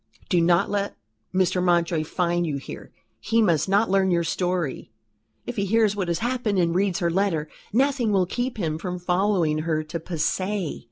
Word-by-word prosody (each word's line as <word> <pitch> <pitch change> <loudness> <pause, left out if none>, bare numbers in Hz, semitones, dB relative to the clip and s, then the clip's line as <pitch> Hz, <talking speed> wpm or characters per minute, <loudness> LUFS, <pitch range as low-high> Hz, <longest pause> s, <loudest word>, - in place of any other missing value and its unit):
Do 180 -4 +3
not 175 +3 +3
let 200 0 -2 0.3
Mr. 185 -1 +1
Mountjoy 170 -2 +2
find 175 +1 0
you 145 -3 -2
here. 135 - -9 0.3
He 225 +2 +1
must 175 -5 +2
not 205 +3 +3
learn 190 0 +2
your 170 -1 +2
story. 175 -3 -2 0.6
If 245 - -6
he 200 - +1
hears 215 0 +2
what 190 -3 -2
has 170 -1 0
happened 240 -5 0
and 170 -2 +2
reads 190 0 +1
her 170 -1 0
letter, 175 -4 0 0.2
nothing 260 -1 +2
will 190 -2 +3
keep 245 +6 -3
him 160 -5 -2
from 180 +1 -4
following 180 -3 +1
her 155 -1 -1
to 160 +2 -5
Passy. 185 +2 -2
180 Hz, 180 wpm, -24 LUFS, 170-205 Hz, 0.6 s, Do